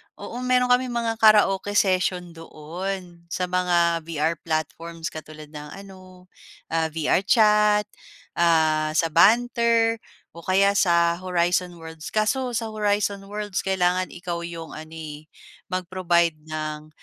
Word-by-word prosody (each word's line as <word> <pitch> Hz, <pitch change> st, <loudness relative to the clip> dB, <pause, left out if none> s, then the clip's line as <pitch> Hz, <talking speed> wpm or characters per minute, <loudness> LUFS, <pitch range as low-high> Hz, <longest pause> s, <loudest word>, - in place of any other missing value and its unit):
oo, 245 Hz, -, -8 dB
meron 250 Hz, 0 st, +2 dB
kaming 250 Hz, -1 st, +2 dB
mga 230 Hz, -1 st, -1 dB
karaoke 205 Hz, -2 st, +4 dB
session 185 Hz, -3 st, +1 dB
doon 170 Hz, +2 st, -7 dB
sa 175 Hz, +2 st, -3 dB
mga 175 Hz, -2 st, +1 dB
VR 160 Hz, 0 st, -1 dB
platforms 165 Hz, +1 st, -4 dB
katulad 155 Hz, -1 st, -10 dB
ng 150 Hz, -1 st, -8 dB, 0.2 s
ano, 185 Hz, -1 st, -15 dB, 0.4 s
ah, 165 Hz, -1 st, +1 dB
VR 160 Hz, +4 st, 0 dB
chat, 210 Hz, -2 st, +4 dB, 0.6 s
ah, 160 Hz, -2 st, +3 dB
sa 165 Hz, 0 st, +1 dB
Banter 230 Hz, +2 st, +3 dB, 0.4 s
o 170 Hz, -, -11 dB
kaya 200 Hz, +2 st, +3 dB
sa 170 Hz, -2 st, +3 dB
Horizon 180 Hz, 0 st, 0 dB
Worlds. 160 Hz, -1 st, -9 dB
Kaso 245 Hz, +4 st, 0 dB
sa 225 Hz, -1 st, -2 dB
Horizon 205 Hz, -2 st, -1 dB
Worlds 205 Hz, -1 st, -4 dB
kailangan 185 Hz, -1 st, 0 dB
ikaw 175 Hz, -1 st, -5 dB
yung 165 Hz, -1 st, -7 dB
ano, 155 Hz, +1 st, -10 dB
eh, 155 Hz, -1 st, -8 dB, 0.4 s
mag-provide 175 Hz, -2 st, 0 dB
ng 155 Hz, -1 st, -5 dB
180 Hz, 125 wpm, -24 LUFS, 165-205 Hz, 0.6 s, karaoke